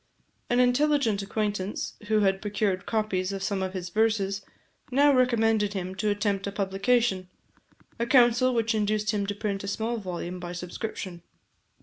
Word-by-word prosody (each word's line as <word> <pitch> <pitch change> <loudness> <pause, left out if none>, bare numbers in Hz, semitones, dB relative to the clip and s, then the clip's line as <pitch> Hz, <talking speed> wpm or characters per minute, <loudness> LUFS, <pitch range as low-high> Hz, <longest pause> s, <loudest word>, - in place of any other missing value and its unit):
An 245 - +2
intelligent 250 -4 +3
acquaintance, 205 -1 -2
who 215 0 +3
had 195 -1 +2
procured 200 -2 -1
copies 200 -4 0
of 195 -1 -4
some 195 -1 -1
of 190 0 -2
his 180 -2 -4
verses, 205 -1 +1 0.5
now 285 +2 +5
recommended 225 -5 +2
him 185 -1 -4
to 210 +3 -1
attempt 205 -1 0
a - - -2
publication 195 0 +1 0.7
a 235 - 0
counsel 250 0 +5
which 230 0 +1
induced 210 0 +1
him 205 -2 -1
to 205 - -2
print 200 -1 -3
a - - -5
small 225 +4 -2
volume 180 -3 -5
by 175 0 -6
subscription. 180 0 -6
205 Hz, 155 wpm, -27 LUFS, 195-225 Hz, 0.7 s, now